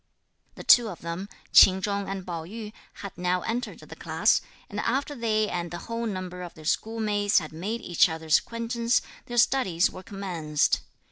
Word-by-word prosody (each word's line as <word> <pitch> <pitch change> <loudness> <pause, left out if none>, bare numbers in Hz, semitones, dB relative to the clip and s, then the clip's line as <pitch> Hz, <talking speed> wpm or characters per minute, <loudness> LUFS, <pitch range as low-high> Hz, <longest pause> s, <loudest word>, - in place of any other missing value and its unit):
The - - -9
two 240 -3 +6
of 180 - -9
them, 170 +4 -5 0.2
Ch'in 190 0 +8
Chung 200 0 -2
and 195 -2 -4
Pao 170 -3 -4
yü, 210 +4 -8 0.3
had 200 - -7
now 180 0 +1
entered 245 +3 -3
the - - -11
class, - - +2 0.3
and 205 - -5
after 270 +6 -1
they 220 -4 0
and 175 -2 -3
the 175 - -5
whole 230 0 -3
number 185 -3 -5
of 175 -1 -8
their 155 - -13
schoolmates 210 +2 +1
had 155 -3 0
made 205 +9 -4
each 175 -3 +3
other's 160 -1 +2
acquaintance, 230 +1 -1 0.2
their 240 - -5
studies 205 -9 +3
were - - -9
commenced. 175 -7 -1
200 Hz, 180 wpm, -27 LUFS, 175-230 Hz, 0.3 s, Ch'in